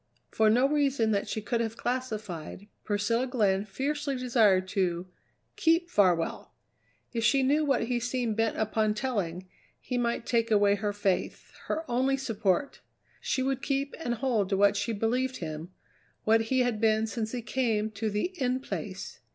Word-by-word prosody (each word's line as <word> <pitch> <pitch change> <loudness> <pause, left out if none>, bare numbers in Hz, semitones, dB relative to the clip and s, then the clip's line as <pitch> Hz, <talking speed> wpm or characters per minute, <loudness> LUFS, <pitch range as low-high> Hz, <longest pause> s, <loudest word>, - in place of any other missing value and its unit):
For 220 -1 +3
no 245 +5 +4
reason 275 -6 +1
that 200 -1 0
she 215 - -3
could 235 +2 0
have 225 0 -3
classified, 215 -8 -4 0.2
Priscilla 225 +5 0
Glenn 205 -6 +1
fiercely 280 +6 -2
desired 225 -7 +3
to 180 -3 0 0.5
keep 345 -3 +2
Farwell! 180 -5 +1 0.6
If 230 -1 -1
she 270 +4 +4
knew 290 +4 +3
what 275 -4 +2
he 240 +1 -1
seemed 245 -2 -1
bent 225 0 0
upon 215 0 +1
telling, 190 -7 -2 0.3
he 250 - -3
might 235 -1 -1
take 230 -1 +1
away 205 -2 +4
her 205 +1 -1
faith 200 -2 -2 0.2
her 320 +1 -2
only 260 +2 +1
support. 225 0 -1 0.4
She 260 - -1
would 270 0 -1
keep 275 +2 -1
and 240 -4 -1
hold 230 -6 0
to 195 - +1
what 200 +1 +4
she 205 +3 -1
believed 250 +5 0
him, 155 0 -6 0.5
what 225 +1 +3
he 260 -1 +3
had 240 -3 0
been 220 0 +3
since 220 -1 -3
he 245 -2 -4
came 220 -4 0
to 215 +1 -2
the 210 - -2
In 255 0 +1
Place. 265 - -6
225 Hz, 170 wpm, -28 LUFS, 205-260 Hz, 0.6 s, no